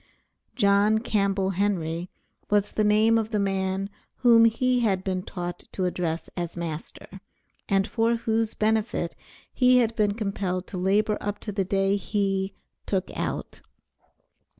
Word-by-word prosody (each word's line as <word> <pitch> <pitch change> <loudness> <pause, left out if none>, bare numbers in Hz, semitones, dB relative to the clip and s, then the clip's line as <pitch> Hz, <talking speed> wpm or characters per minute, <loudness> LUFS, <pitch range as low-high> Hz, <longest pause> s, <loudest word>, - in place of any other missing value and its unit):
John 200 +2 +4
Campbell 200 -4 0
Henry, 180 -3 -1 0.4
was 205 -1 +2
the 215 - 0
name 215 +2 +4
of 220 -1 -3
the 215 - -1
man 195 0 -1 0.3
whom 230 -2 +7
he 250 +2 +2
had 195 -5 +1
been 185 -1 -1
taught 175 -1 -6
to 185 - -1
address 170 -2 -2
as 175 -1 -4
master, 170 +3 -7 0.5
and 195 0 +3
for 230 0 +1
whose 225 -1 -1
benefit 215 -5 0 0.4
he 250 -1 +5
had 230 -2 +2
been 205 -2 +1
compelled 195 -4 -2
to 185 - -5
labor 205 +3 +2
up 205 0 -3
to 210 - -5
the 195 -1 -1
day 195 +1 +1
he 195 -1 -1 0.3
"took 190 -2 -1
out." - - -4
200 Hz, 145 wpm, -26 LUFS, 190-220 Hz, 0.5 s, whom